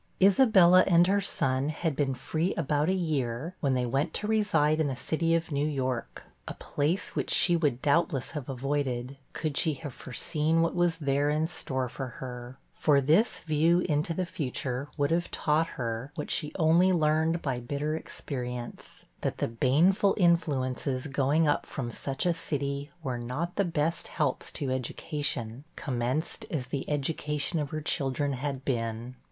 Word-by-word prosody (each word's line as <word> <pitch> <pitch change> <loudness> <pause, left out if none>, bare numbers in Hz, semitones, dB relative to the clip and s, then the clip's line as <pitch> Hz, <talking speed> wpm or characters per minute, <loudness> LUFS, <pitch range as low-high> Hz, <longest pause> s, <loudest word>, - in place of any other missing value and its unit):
Isabella 190 -3 +6
and 175 -1 +6
her 200 +2 +2
son 135 -5 0
had 155 -1 -2
been 135 -2 0
free 160 +8 -1
about 150 0 +1
a - - +3
year, 155 -4 -1
when 135 -3 +1
they 125 -1 +1
went 135 +4 -1
to - - -2
reside 165 -9 +2
in 155 - +2
the 135 - -2
city 165 +5 0
of 165 0 -2
New 145 +1 +1
York; 130 -4 -3 0.2
a - - -5
place 155 +7 -2
which - - -1
she 175 - +4
would 145 -7 0
doubtless 145 -2 +1
have 145 -4 -6
avoided, 135 -1 -2 0.2
could 155 -3 -3
she 155 -2 +2
have 140 -1 -7
foreseen 155 +6 0
what 165 - 0
was 175 -2 +1
there 145 -1 +1
in 155 +1 +1
store 130 -6 -1
for 135 +2 -5
her; 125 0 -7 0.2
for 145 -2 +3
this 160 - +2
view 165 +3 +3
into 150 0 0
the 185 - -1
future 135 -3 -3
would 145 0 +1
have 170 +1 +1
taught 155 +2 +1
her 115 +2 -3
what 150 - -4
she 150 -2 -1
only 170 +2 +4
learned 160 0 +2
by 130 -4 -1
bitter 145 +5 -2
experience, 125 -6 -6 0.2
that - - -2
the - - 0
baneful 155 - +3
influences 140 - +1
going 145 +3 +2
up 145 - +1
from 120 -5 -4
such 135 +5 -2
a 175 - +3
city 140 -3 -3
were 130 -4 -2
not 145 +9 -4
the 200 - +2
best 165 -2 -1
helps 145 -5 -2
to 140 -4 -3
education, 130 -1 -3
commenced 130 +4 -2
as 140 -6 -2
the 135 +2 -4
education 150 +1 0
of 145 -2 -2
her 155 +1 -4
children 140 0 0
had 135 0 -4
been. 115 -1 -2
145 Hz, 170 wpm, -28 LUFS, 130-165 Hz, 0.2 s, Isabella